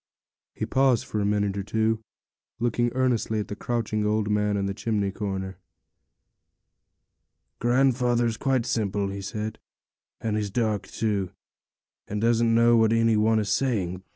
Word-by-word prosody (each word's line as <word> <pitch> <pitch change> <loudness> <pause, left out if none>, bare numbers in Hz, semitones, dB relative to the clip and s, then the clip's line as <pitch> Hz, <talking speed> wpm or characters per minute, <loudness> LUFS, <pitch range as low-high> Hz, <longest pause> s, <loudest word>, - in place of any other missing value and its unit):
He - - -2
paused 130 -3 +2
for 105 - -3
a 100 - 0
minute 105 -1 0
or 100 - -2
two, 110 +2 0 0.6
looking 120 0 +1
earnestly 125 -4 +1
at 105 - -4
the 105 - -4
crouching 110 -1 -2
old 105 0 0
man 105 0 +1
in 100 - -1
the 100 - -2
chimney 105 -2 -1
corner. 95 -2 -4 2.0
'Grandfather's 120 -2 +2
quite 130 -1 0
simple,' 100 -2 -1
he 100 0 -5
said, 105 +2 -5 0.6
'and 110 -2 -1
he's 105 -1 -2
dark, 110 -2 -1
too, 105 -4 -1 0.8
and 105 - -3
doesn't 115 0 +3
know 120 +1 +5
what 110 0 +4
any 115 -1 +3
one 110 +1 +3
is 105 -2 0
saying. 95 -5 0
110 Hz, 150 wpm, -26 LUFS, 105-115 Hz, 2.0 s, know